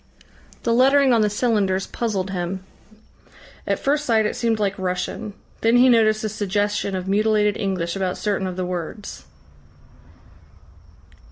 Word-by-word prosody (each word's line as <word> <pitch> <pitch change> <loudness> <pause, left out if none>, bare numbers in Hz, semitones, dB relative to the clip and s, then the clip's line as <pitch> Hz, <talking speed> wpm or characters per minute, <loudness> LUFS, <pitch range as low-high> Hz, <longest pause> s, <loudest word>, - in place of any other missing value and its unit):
The 230 - +1
lettering 270 +2 +4
on 230 - +4
the 210 - +2
cylinders 205 -4 0
puzzled 200 -5 -3
him. 185 +1 -4 1.0
At - - +1
first 290 +2 0
sight 225 -5 +2
it - - -1
seemed 230 -2 0
like 200 -2 0
Russian. 185 +3 -3 0.3
Then 230 +2 +4
he 255 +1 +6
noticed 215 -2 +3
a 215 - -1
suggestion 205 -1 -1
of 185 0 -4
mutilated 210 +1 +2
English 180 -3 -2
about 190 -2 -2
certain 200 -2 -1
of 185 - -5
the 185 0 -3
words. 180 +3 -6
210 Hz, 145 wpm, -22 LUFS, 190-225 Hz, 1.0 s, he